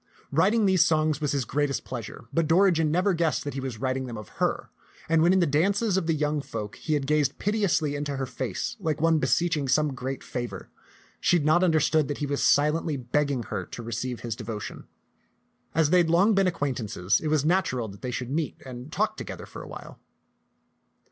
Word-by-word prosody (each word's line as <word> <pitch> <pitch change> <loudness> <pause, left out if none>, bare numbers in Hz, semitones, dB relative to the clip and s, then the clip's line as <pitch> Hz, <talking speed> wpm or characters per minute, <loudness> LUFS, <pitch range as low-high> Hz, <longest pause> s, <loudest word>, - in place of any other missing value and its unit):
Writing 200 +9 +3
these 190 -3 +5
songs 155 -2 +1
was 150 - 0
his 140 -4 0
greatest 145 +1 -1
pleasure; 115 -3 -7
but 165 +1 +2
Dorigen 165 -2 +4
never 180 +5 +2
guessed 165 -2 0
that 145 - -4
he 135 - -4
was 130 -4 -4
writing 130 +1 -2
them 120 -2 -6
of 105 -2 -9
her, - - 0 0.4
and 165 0 +3
when 170 +2 +5
in 190 0 +4
the - - +4
dances 195 +8 +2
of 190 -4 0
the 165 - +2
young 150 0 0
folk 105 -6 -6
he 155 - -1
had 140 -2 -1
gazed 150 -1 +1
piteously 195 -8 +1
into 145 0 -3
her 135 - -1
face 125 - -4
like 160 -5 -1
one 165 0 +3
beseeching 165 -3 +1
some 150 +2 +2
great 130 +1 -5
favor, 120 -2 -6 0.5
she - - +3
had 150 - -2
not 165 +4 +4
understood 155 -3 +3
that 145 - -3
he 145 - -2
was 140 0 -2
silently 150 +1 +2
begging 135 +1 0
her - - -4
to 120 - -9
receive 120 +2 -4
his 115 -3 -3
devotion. 110 -2 -7 0.9
As 160 -1 +3
they 180 - +6
had 170 -2 +2
long 190 +6 +4
been 195 -1 +3
acquaint 145 -7 -1
ances, 100 -1 0
it 155 - -3
was 150 -2 +2
natural 155 -9 +1
that 100 0 -12
they 125 - -4
should 125 0 -4
meet 155 +1 -2
and 130 +2 -8
talk 215 +4 0
together - - -7
for - - -10
a - - -9
while. - - -10
150 Hz, 210 wpm, -26 LUFS, 130-165 Hz, 0.9 s, they